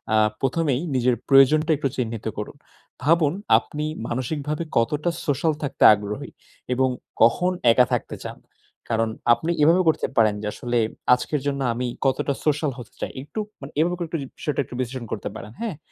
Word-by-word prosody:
আ - - +5 0.2
প্রথমেই 140 0 +1
নিজের 125 -1 +3
প্রয়োজনটা 150 +4 +5
একটু 140 -1 -1
চিহ্নিত 115 -3 -3
করুন। 105 - -5 0.5
ভাবুন 155 0 +3 0.2
আপনি 150 +1 -4 0.2
মানসিকভাবে 145 +5 -2
কতটা 150 +8 +1 0.2
সোশ্যাল 150 +2 +1
থাকতে 145 - -1
আগ্রহী 105 0 -4 0.4
এবং 130 +1 +2 0.3
কখন 150 +11 +4 0.2
একা 125 +2 +5
থাকতে - - -2
চান? - - -7 0.5
কারণ 115 -1 +1 0.2
আপনি 160 +7 -1
এভাবে 170 +5 +5
করতে 160 - +2
পারেন 110 -2 +5
যে 105 - -3
আসলে 120 0 -2 0.4
আজকের 135 +3 0
জন্য 140 -1 -1
আমি 125 +1 -2 0.2
কতটা 135 +1 +1
সোশ্যাল 150 -1 +1
হতে 120 0 -11
চাই। - - -3
একটু 145 +10 -7 0.2
মানে 135 - -8
এভাবে 175 +2 +2
করে 170 -1 -4
একটু 165 +1 -3
যদি 135 - -6
বিষয়টা 145 -2 -1
একটু 125 - -10
বিশ্লেষণ 125 -1 -3
করতে 100 - -3
পারেন। 105 - -8
হ্যাঁ? 215 -10 -3
135 Hz, 170 wpm, -23 LUFS, 120-155 Hz, 0.5 s, আ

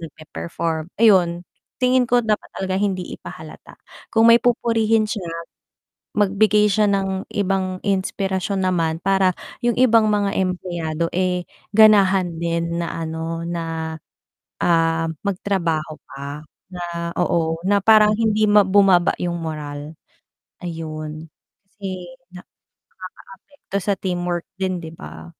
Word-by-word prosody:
pe-perform 160 +1 -4
ayun 175 -5 +4 0.4
tingin 255 0 +4
ko 245 0 +3
dapat 215 -1 0
talaga 190 0 -2
hindi 190 -3 -2
ipahalata - - -11 0.4
kung 225 +1 +6
may 235 - +8
pupurihin 225 -2 +2
siya 195 -7 -4 0.9
magbigay 210 +1 +3
siya 210 +2 +3
ng 195 -1 -1
ibang 190 -2 0
inspirasyon 195 0 -1
naman 165 -3 0
para 190 -2 +3 0.3
yung 240 -1 +2
ibang 230 -3 +5
mga 205 -1 +1
empleyado 175 -3 -2
eh 180 -1 0 0.3
ganahan 195 -5 +5
din 170 0 -1
na 170 - -3 0.2
ano 165 +1 -4
na, 165 -1 -4 0.7
um, 165 -1 +2 0.2
magtrabaho 170 -5 -1 0.2
pa 140 +2 -7 0.3
na, 170 -1 -4
oo, 165 -2 +1
na 205 +1 +4
parang 215 0 +6
hindi 215 -1 +2
bumaba 195 -3 +5
yung 175 -1 -2
moral 150 -1 -6 0.7
ayun, 155 -2 -6 0.4
kasi 185 -3 -7 1.0
nakakaapekto 200 0 -10
sa 200 +1 +1
teamwork 175 -2 -2
din 185 -1 -1
'di 165 -1 -9
ba? 165 - -10
185 Hz, 115 wpm, -21 LUFS, 165-205 Hz, 1.0 s, may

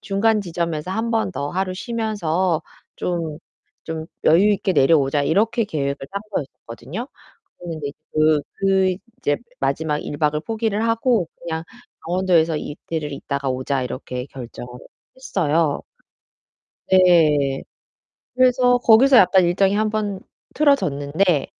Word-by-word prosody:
중간 210 +2 +1
지점에서 170 -2 -3
1 225 +3 -2
번 225 -4 0
더 140 -1 -3
하루 185 0 -2
쉬면서 190 -7 -1 0.3
좀, 165 -3 -3 0.5
좀 160 -1 -5 0.2
여유있게 195 +3 +4
내려오자.' 145 -1 +3
이렇게 220 - +1
계획을 140 -6 -2
짠 200 +1 -4
거였거든요. 145 - -6 0.5
그랬는데 160 -4 -5
이제 140 - -14 0.2
그 155 -1 +3 0.2
그 190 -1 +2 0.2
이제 145 - 0 0.2
마지막 150 +2 -1
1 145 - -6
박을 150 0 +1
포기를 220 0 -1
하고 230 -5 +1
그냥 160 -1 -4 0.4
'강원도에서 170 -3 +2
이틀을 150 -1 -5
있다가 140 -1 -3
오자.' 130 +1 -1
이렇게 125 0 -5
결정을 125 -2 -9 0.5
했어요. 165 - 0 1.1
네. 155 -7 +4 0.7
그래서 250 -1 +4
거기서 245 +3 +6
약간 185 -2 +6
일정이 190 +3 +2
한번 210 -2 -1 0.3
틀어졌는데 160 - +2
170 Hz, 270 characters per minute, -21 LUFS, 150-205 Hz, 1.1 s, 거기서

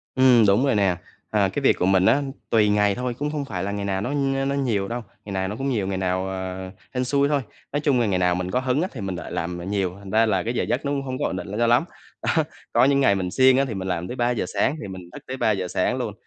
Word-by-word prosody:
Ừm 125 -4 +6
đúng 105 +8 +4
rồi 135 - +2
nè, 95 -3 +2 0.3
ờ, - - +2
cái - - -1
việc - - +5
của 90 - +2
mình 95 -1 +4
á, 145 - +4 0.3
tùy 105 -2 +4
ngày 105 -1 +3
thôi, 125 -1 -2
cũng 145 +4 -3
không 145 -2 -3
phải 90 -8 -4
là 100 - -2
ngày 100 -1 -3
nào 95 -1 -1
nó 130 +6 -2 0.3
nó 140 0 0
nhiều 110 -8 0
đâu, 120 +1 -3 0.2
ngày 100 - -6
nào 95 0 -1
nó 105 - -4
cũng 135 +3 -2
nhiều, 105 -7 0
ngày 95 - -2
nào, 95 0 -1
ờ, 95 0 -5 0.2
hên 125 0 0
xui 140 +2 +2
thôi. 145 -2 +2 0.3
Nói 145 - 0
chung 140 -4 +2
là 115 - +2
ngày 95 -3 +1
nào 90 -1 +2
mình 90 0 -3
có 125 - +1
hứng 130 +3 0
á 185 - 0
thì 115 - -7
mình 95 -2 -3
lại 85 - -7
làm, 85 +1 -3
à, 85 - -7
nhiều, 95 -2 -1
thành 100 -1 -10
ra 110 +1 +4
là 95 -4 +1
cái 115 +2 -2
giờ - - 0
giấc 135 - -1
nó 140 - 0
cũng 140 -1 -1
hông 130 -1 -4
có - - 0
ổn - - -2
định - - -5
l 100 - -5
cho 120 0 +2
lắm. 120 +7 +4 0.4
Đó. 160 -2 +2 0.3
Có 120 +2 +5
những 140 0 +3
ngày 100 -7 +4
mình 90 -2 -2
siêng 130 0 +5
á 135 - +3
thì 115 - -4
mình 95 -1 -4
làm 90 -1 -2
tới 125 - -5
3:00 120 -5 0
sáng, 145 - +1
thì 105 - -6
mình 90 -2 -9
thức - - -10
tới 130 +1 -4
3:00 100 -6 +1
sáng - - 0
luôn - - -3
105 Hz, 310 wpm, -24 LUFS, 95-130 Hz, 0.4 s, Ừm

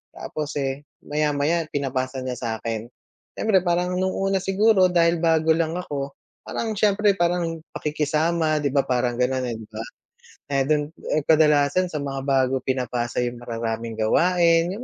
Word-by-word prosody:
tapos 150 -1 -5
eh, 140 0 -3 0.2
maya-maya 150 +2 0
pinapasa 130 -2 -3
niya 125 -1 -4
sa'kin. 115 -1 -3 0.5
Siyempre, 215 -4 +3
parang 180 +1 +1
nung 185 0 0
una 195 0 +1
siguro 195 0 +4
dahil 170 -1 +3
bago 160 -1 +3
lang 165 0 +1
ako, 140 -6 -4 0.3
parang 225 - -2
siyempre 210 0 +4
parang 170 -2 0 0.2
pakikisama, 155 +1 0
’di 140 - +1
ba, 140 0 +2
parang 125 -1 0
gano'n 130 +1 +1
eh, - - -3
’di 110 - -11
ba. 110 +1 -6 0.7
Eh, 135 -1 +2
do’n, 150 0 +1 0.2
eh, 155 - +1
kadalasan 150 +2 +4
sa 155 -4 -4
mga 135 -1 -3
bago 135 -1 +2
pinapasa 125 -2 -2
’yong 120 0 -4
mararaming 115 -1 -4
gawain, 165 +9 +3
’yong 220 +5 -7
150 Hz, 155 wpm, -23 LUFS, 130-170 Hz, 0.7 s, siguro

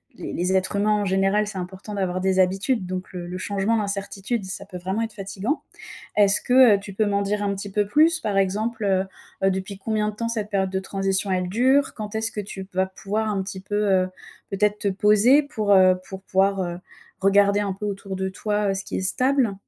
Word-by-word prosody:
les - - -7
les 180 +2 0
êtres 190 +2 0
humains 205 +1 +1
en - - -1
général, 195 +2 +2
c'est 205 -2 -6
important 190 +3 -7
d'avoir 185 -2 -1
des 190 0 +1
habitudes, 195 +4 +1
donc 185 0 -5
le 175 -1 -6
le 180 +1 -5
changement, 200 +4 0
l'incertitude, 200 +2 -3
ça 190 0 -6
peut 180 - -8
vraiment 190 +5 -2
être 225 -1 -5
fatiguant. 200 +7 -3 0.6
Est-ce 205 -1 +5
que, 250 -4 +6
heu, - - -5
tu 195 0 -9
peux 215 - +1
m'en 200 0 +1
dire 205 +1 -1
un 200 -1 0
petit 200 +1 -6
peu 205 +1 +1
plus? 315 +8 +4
Par 205 -3 -1
exemple, 215 +4 -1
heu 190 -1 +2 0.4
heu, 195 - +5
depuis 190 +1 -4
combien 215 +1 -1
de - - -13
temps 230 +2 -3
cette 215 -3 -3
période 190 -2 0
de 190 - -1
transition 195 +1 -1
elle 180 -1 0
dure? 260 +8 +3
Quand 215 -1 -6
est-ce 220 +1 -1
que 215 - -4
tu 195 -1 -7
p 190 - -22
vas 190 0 +3
pouvoir 205 +3 -3
un 195 -2 -1
petit 190 0 -7
peu, 205 +2 -6
heu, 195 -3 +2 0.4
peut-être 210 +1 +1
te 205 - -1
poser 210 +8 +4
pour, 215 -8 -1
heu, 185 -1 +6
pour 190 0 -8
pouvoir, 195 0 +1
heu, 175 -1 -4 0.4
regarder 200 +1 +4
un 200 -2 -1
peu 195 +2 -7
autour 195 -1 -5
de 190 0 -2
toi, 210 +2 -1
heu, - - 0
ce 195 +1 -4
qui - - -5
est - - -1
stable? 250 +3 +1
200 Hz, 230 wpm, -23 LUFS, 190-210 Hz, 0.6 s, que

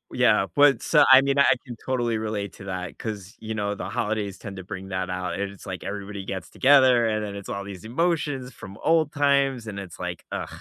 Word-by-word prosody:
yeah, 110 -5 +4
but 145 -1 +6
s - - -5 0.2
I 130 0 +10
mean, 140 0 +1
I - - +7 0.2
can 120 -3 -7
totally 120 -3 0
relate 105 -2 -3
to 95 - -12
that, 90 -1 -5
'cause, 105 -3 -6
you 110 0 -5
know, 105 -1 -1
the - - -6
holidays 105 -2 -2
tend 100 -2 -8
to 95 - -7
bring 95 0 -7
that 95 0 -2
out, 90 0 -3
and 100 0 -2
it's 100 - -14
like 95 -2 -6
everybody 100 0 -5
gets 95 -2 -6
together, 130 -4 +5
and 110 -1 -1
then 100 -1 -6
it's 100 - -8
all 100 - -3
these 100 -3 -9
emotions 140 -1 -1
from 95 +1 -11
old 160 -2 +3
times, 140 -4 +2
and 100 -2 -6
it's 90 -4 -9
like, - - -5
"Ugh," - - -3
105 Hz, 225 wpm, -25 LUFS, 100-130 Hz, 0.2 s, I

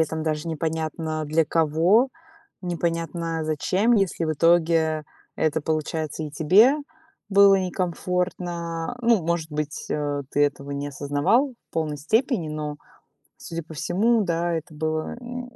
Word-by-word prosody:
этом 160 0 0
даже 155 +1 -2
непонятно 160 0 -2
для 160 +2 +2
кого, 165 - +3 0.5
непонятно 165 -2 -2
зачем, 185 +9 +1
если 190 -5 +1
в 155 - 0
итоге 160 -1 +3 0.3
это 160 0 0
получается 155 0 -2
и 150 - -4
тебе 190 - +5 0.5
было 200 0 +7
некомфортно. 180 0 -2
Ну, 230 -7 +3
может 165 -1 -1
быть, 150 0 -4
э, 145 -1 -1
ты 145 - +2
этого 140 0 -5
не 140 +1 -3
осознавал 150 - +1 0.2
в - - -54
полной 155 -2 -1
степени, 215 - +1
но, 150 -1 -4 0.6
судя 165 -1 -6
по 160 - -13
всему, 215 +9 +2
да, 170 -2 0
это 160 0 -5
было 155 +3 -2
м, 245 0 -7
165 Hz, 135 wpm, -24 LUFS, 155-180 Hz, 0.6 s, было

